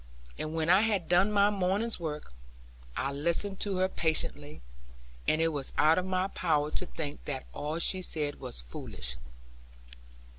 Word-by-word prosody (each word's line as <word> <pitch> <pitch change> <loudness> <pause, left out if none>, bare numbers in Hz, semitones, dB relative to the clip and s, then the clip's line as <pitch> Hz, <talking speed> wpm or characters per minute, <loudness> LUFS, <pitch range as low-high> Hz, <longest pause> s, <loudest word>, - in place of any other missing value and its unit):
And 155 +1 -4
when 160 -1 0
I 185 +3 +6
had 205 -6 +1
done 180 +4 +4
my 205 0 +4
morning's 200 +3 +1
work, 150 - -5 0.6
I 135 - 0
listened 170 +7 +1
to 200 -2 +1
her 185 0 +3
patiently; 150 - -1 0.6
and 155 - +3
it 165 - +3
was 145 -4 -3
out 155 +3 +5
of 185 - -3
my 185 0 +1
power 155 -5 +1
to 185 - -3
think 150 -4 -6
that 135 -3 -4
all 150 +2 -3
she 185 +2 +3
said 150 -5 -3
was 125 - -5
foolish. 60 0 -2
165 Hz, 160 wpm, -30 LUFS, 150-185 Hz, 0.6 s, I